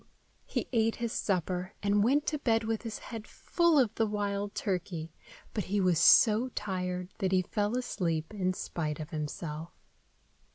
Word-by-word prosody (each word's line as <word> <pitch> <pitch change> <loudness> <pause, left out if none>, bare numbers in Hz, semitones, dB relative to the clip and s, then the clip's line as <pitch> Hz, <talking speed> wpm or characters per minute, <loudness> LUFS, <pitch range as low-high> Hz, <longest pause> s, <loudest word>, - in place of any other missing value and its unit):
He - - -2
ate 225 -1 +2
his 235 -1 -3
supper, 180 -1 -1
and 205 0 +3
went 285 +7 +3
to 300 - -1
bed 225 -4 +2
with 220 0 -1
his 225 -2 -5
head 225 -3 -8
full 340 -3 +2
of 240 -6 +3
the 225 -1 +1
wild 205 -1 -2
turkey, 175 -5 -3 0.4
but 210 - -2
he 205 +2 0
was 180 -4 +3
so 220 +8 +6
tired 180 -2 -3
that 190 -3 0
he 185 -1 +3
fell 210 +5 -1
asleep 170 -8 -2
in 185 -3 0
spite 155 -4 -3
of 155 +2 -6
himself. 155 +1 -4
200 Hz, 165 wpm, -30 LUFS, 180-225 Hz, 0.4 s, so